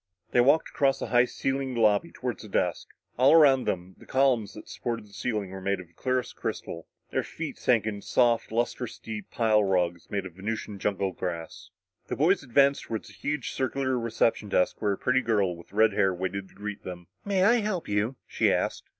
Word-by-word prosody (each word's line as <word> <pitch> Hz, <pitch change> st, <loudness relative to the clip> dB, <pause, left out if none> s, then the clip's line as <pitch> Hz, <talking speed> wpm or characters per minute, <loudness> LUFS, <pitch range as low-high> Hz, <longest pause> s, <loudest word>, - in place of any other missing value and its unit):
They 120 Hz, -, +5 dB
walked 145 Hz, +6 st, +4 dB
across 135 Hz, -1 st, +2 dB
the -, -, -5 dB
high 120 Hz, 0 st, +5 dB
ceilinged 135 Hz, 0 st, -2 dB
lobby 110 Hz, +7 st, +3 dB
toward 125 Hz, -2 st, -4 dB
the 110 Hz, -, -10 dB
desk. 90 Hz, -3 st, -1 dB, 0.3 s
All 135 Hz, +4 st, +6 dB
around 140 Hz, -5 st, +6 dB
them, 90 Hz, +1 st, -3 dB
the -, -, -16 dB
columns 130 Hz, -6 st, +2 dB
that 105 Hz, -, -10 dB
supported 115 Hz, -3 st, -4 dB
the 100 Hz, -, -20 dB
ceiling 105 Hz, -3 st, -2 dB
were 95 Hz, 0 st, -7 dB
made 100 Hz, 0 st, 0 dB
of 90 Hz, -, -9 dB
the 85 Hz, -, -29 dB
clearest 130 Hz, +6 st, -2 dB
crystal. 85 Hz, 0 st, -5 dB, 0.2 s
Their -, -, +1 dB
feet -, -, -6 dB
sank 115 Hz, -4 st, +2 dB
into 105 Hz, -2 st, -5 dB
soft, 120 Hz, -3 st, +2 dB
lustrous 120 Hz, +1 st, -2 dB
deep 105 Hz, -3 st, -7 dB
pile 110 Hz, -2 st, +3 dB
rugs 90 Hz, -3 st, 0 dB
made 100 Hz, -2 st, -2 dB
of 90 Hz, -, -8 dB
Venusian 105 Hz, +2 st, -5 dB
jungle 100 Hz, -1 st, 0 dB
grass. 85 Hz, -3 st, -6 dB, 0.4 s
The -, -, -3 dB
boys 175 Hz, +7 st, +3 dB
advanced 140 Hz, +2 st, +3 dB
toward 110 Hz, -1 st, -4 dB
the 100 Hz, -, -13 dB
huge 145 Hz, +5 st, -3 dB
circular 130 Hz, 0 st, -1 dB
reception 115 Hz, -2 st, 0 dB
desk 90 Hz, -1 st, +1 dB
where 105 Hz, -2 st, +2 dB
a -, -, -5 dB
pretty 130 Hz, +1 st, +2 dB
girl 105 Hz, -7 st, +1 dB
with 85 Hz, -, -15 dB
red 110 Hz, +1 st, +4 dB
hair 95 Hz, -1 st, +3 dB
waited 95 Hz, +1 st, -4 dB
to -, -, -22 dB
greet 105 Hz, 0 st, -6 dB
them. 90 Hz, -1 st, -7 dB, 0.2 s
"May 195 Hz, -2 st, +1 dB
I 230 Hz, +5 st, +5 dB
help 210 Hz, -6 st, -2 dB
you?" 105 Hz, +5 st, 0 dB
she -, -, +2 dB
asked. -, -, -1 dB
110 Hz, 205 wpm, -27 LUFS, 100-130 Hz, 0.4 s, All